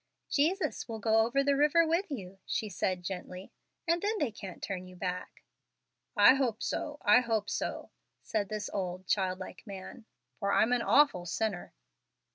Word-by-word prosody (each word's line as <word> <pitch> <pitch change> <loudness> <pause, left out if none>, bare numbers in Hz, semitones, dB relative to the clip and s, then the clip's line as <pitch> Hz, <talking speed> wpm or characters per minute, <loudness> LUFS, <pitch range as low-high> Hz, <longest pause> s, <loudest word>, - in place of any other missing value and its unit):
"Jesus 340 +7 +1
will 225 -2 -4
go 220 +1 +3
over 275 +4 +1
the 280 0 +3
river 300 +4 +4
with 335 +4 0
you," 195 -8 -7
she 215 - -1
said, 185 -1 -1
gently, 185 0 -6 0.4
"and 335 +1 +2
then 425 +2 0
they 290 - 0
can't 195 -3 -9
turn 185 -2 -5
you 185 - -12
back." 180 0 -5 0.7
"I 205 +5 +9
hope 250 -5 0
so, 295 -1 -3
I 210 +1 +7
hope 225 -4 -1
so," - - -3 0.3
said 205 -3 -1
this 215 -1 -3
old, 185 -2 -3
child 185 -1 +1
like 185 - -9
man, 200 +4 -9 0.3
"for 200 -2 0
I'm 235 +3 +4
an 245 - +2
awful 250 -11 +4
sinner." 200 0 -2
215 Hz, 170 wpm, -31 LUFS, 190-275 Hz, 0.7 s, I